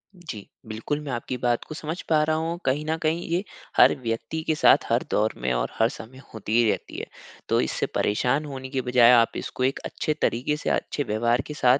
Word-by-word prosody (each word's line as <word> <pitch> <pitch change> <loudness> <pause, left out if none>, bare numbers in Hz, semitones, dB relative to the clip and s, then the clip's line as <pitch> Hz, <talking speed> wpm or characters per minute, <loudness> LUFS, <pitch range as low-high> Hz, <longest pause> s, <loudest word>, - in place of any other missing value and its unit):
जी, 150 - -9 0.2
बिल्कुल। 115 +7 -3
मैं 140 - -5
आपकी 125 +1 -3
बात 120 -1 0
को 155 - -7
समझ 160 +3 -5
पा 155 -1 +4
रहा 155 0 +1
हूँ। 165 +2 -2
कहीं 145 +3 0
न 160 +1 -1
कहीं 160 +2 0
ये 175 +4 0 0.3
हर - - +7
व्यक्ति 115 +7 -3
के 155 - +2
साथ - - +5
हर - - +2
दौर 110 +1 +2
में 65 +1 -1
और - - -1
हर 115 +1 +4
समय 130 +3 -10 0.2
होती 110 0 -3
ही 115 -2 +4
रहती - - -3
है। - - -5 0.4
तो - - +3
इससे 65 - -1
परेशान 125 +8 +1
होने 130 -2 -7
के 130 -1 -1
बजाय 125 -1 +5
आप 115 -1 +5
इसको 130 - -4
एक 135 +1 +1
अच्छे 155 - -2
तरीके 130 +6 +1
से - - -3
अच्छे 145 - -1
व्यवहार 120 +3 +1
के 150 - -5
साथ 130 -1 +4
130 Hz, 225 wpm, -25 LUFS, 115-155 Hz, 0.4 s, हर